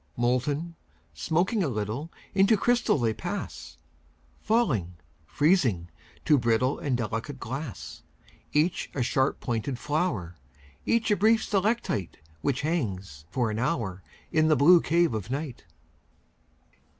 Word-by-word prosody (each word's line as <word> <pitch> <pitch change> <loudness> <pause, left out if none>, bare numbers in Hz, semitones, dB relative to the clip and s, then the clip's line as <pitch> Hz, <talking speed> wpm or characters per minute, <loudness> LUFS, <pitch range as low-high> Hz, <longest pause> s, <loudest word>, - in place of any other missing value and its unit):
Molten, 140 +7 0 0.4
smoking 175 - 0
a - - 0
little, 120 +7 -3 0.2
Into 200 +3 +4
crystal 240 -2 +2
they 115 -4 +1
pass; - - -6 0.6
Falling, 130 - +1 0.3
freezing, 125 - +2 0.3
to 150 -3 +5
brittle 120 +3 +1
And 135 -4 0
delicate 120 +4 -4
glass. 135 +1 -6 0.5
Each 155 +4 +1
a 130 - +1
sharp 130 +2 +1
pointed 120 +2 -2
flower, 125 - -2 0.5
Each 230 -1 +2
a - - +5
brief 220 +3 +3
stalactite 200 - -1 0.2
Which 140 - 0
hangs 100 - -3
for 120 -1 0
an 105 - -3
hour 115 - -1 0.3
In 155 0 +3
the 155 - +5
blue 165 +5 +7
cave 170 -4 +2
of 105 -2 -4
night. 135 - -4
135 Hz, 125 wpm, -27 LUFS, 110-170 Hz, 0.6 s, blue